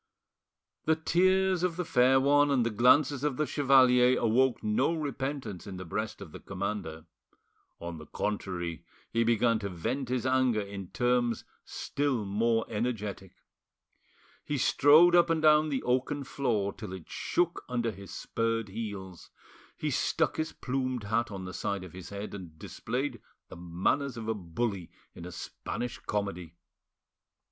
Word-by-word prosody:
The 160 - +4
tears 185 +3 +2
of 180 -2 0
the 180 0 -3
fair 130 0 +4
one 145 +2 +4
and 130 -4 +2
the 115 - 0
glances 130 +5 +4
of 145 -4 0
the 150 - +1
chevalier 130 -3 +5
awoke 120 +3 +2
no 125 +10 +1
repentance 135 - -4
in 95 -2 -6
the 95 - -7
breast 105 +6 -4
of 90 -6 -9
the - - -9
commander; 95 -5 -5 0.7
on 85 -1 -6
the 75 - -11
contrary, 90 -5 -3 0.3
he 115 0 +2
began 115 0 +2
to 100 -2 -4
vent 115 +9 -3
his 125 -1 -1
anger 130 -3 +2
in 100 -2 -7
terms 120 +3 0 0.2
still 140 -7 -2
more 115 +3 +1
energetic. 105 -4 -3 1.1
He 145 - -2
strode 155 +7 +6
up 175 -1 +5
and 165 -1 +2
down 155 0 +5
the 135 -3 -2
oaken 130 +3 0
floor 110 -8 -1
till 105 -5 -8
it 90 -4 -9
shook 175 -1 -1
under 120 -2 0
his 100 -1 -11
spurred 115 -2 -2
heels; 95 -4 -7 0.5
he - - -2
stuck - - 0
his 160 0 -1
plumed 130 -2 -3
hat 110 +4 0
on 95 -2 -6
the 90 - -7
side 100 +1 -3
of 90 - -11
his 90 -1 -9
head, 100 +1 -6
and 90 -6 -9
displayed 125 - -4 0.3
the - - -9
manners 90 +11 -1
of 110 -1 -6
a 110 - +1
bully 95 0 -3 0.2
in 85 - -10
a 90 - -7
Spanish 120 +7 -5
comedy. 90 -5 -4
115 Hz, 155 wpm, -29 LUFS, 100-135 Hz, 1.1 s, strode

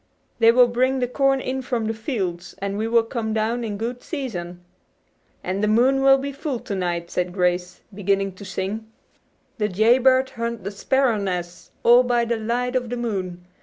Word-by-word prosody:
"They 230 0 +7
will 245 +1 +6
bring 255 +2 +1
the 250 -1 0
corn 270 +1 +2
in 265 0 -3
from 240 -3 -2
the 220 - -1
fields, 195 - -4
and 200 0 -3
we 215 +2 -1
will 230 0 +4
come 225 -2 -3
down 225 +2 0
in 210 -3 -4
good 240 +3 -4
season." 180 - -5 0.8
"And 190 +3 -2
the - - +3
moon 250 +5 +3
will 270 0 +6
be 280 +1 -4
full 275 -1 -4
to 240 -4 -5
night," 175 -2 -2
said 180 0 -1
Grace, 180 -1 -1
beginning 195 0 0
to 185 +2 -12
sing: 200 +3 -4 0.7
"'De 210 -1 +1
jay 220 +6 +4
bird 260 0 +3
hunt 235 -3 -4
de 200 - -4
sparrer 245 +2 +1
nes', 180 -3 -4
All 240 +1 +7
by 240 -1 +1
de 235 0 0
light 245 +3 -2
of 245 -2 -1
de 245 - -3
moon. 185 -7 -4
225 Hz, 195 wpm, -23 LUFS, 195-250 Hz, 0.8 s, They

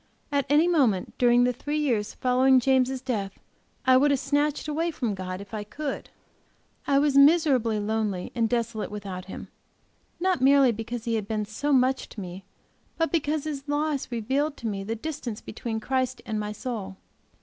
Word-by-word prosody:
At 280 -1 0
any 300 +4 +5
moment 255 - +2
during 245 0 +5
the 250 0 +2
three 290 +5 -3
years 235 -9 0
following 255 +1 +4
James' 260 0 +2
death 210 -7 -3 0.5
I 260 0 +6
would 290 +3 +4
have 280 -2 +2
snatched 290 +2 0
away 320 +3 0
from 245 -9 -2
God, 185 -1 -5
if 200 +1 -13
I 215 -1 -3
could; 285 +7 -5 0.8
I 275 - +3
was 285 0 +2
miserably 280 -7 +5
lonely 210 -3 -2
and 230 -2 +1
desolate 230 -2 -1
without 195 -3 -6
him, 190 - -8 0.7
not 370 -5 +1
merely 270 -1 +6
because 230 +1 -5
he 230 - -1
had 215 -3 -1
been 215 -1 -1
so 250 +8 -2
much, 265 0 +2
to - - -9
me, 185 0 -8 0.5
but 325 0 0
because 305 -2 0
his 290 -3 -4
loss 290 -2 -1
revealed 270 +6 -1
to 235 - -5
me 200 -2 -3
the 225 +3 -3
distance 250 -4 -5
between 220 0 -5
Christ 255 +2 -1
and 215 -1 -2
my 210 0 -3
soul. 210 -5 -5
250 Hz, 180 wpm, -26 LUFS, 215-285 Hz, 0.8 s, I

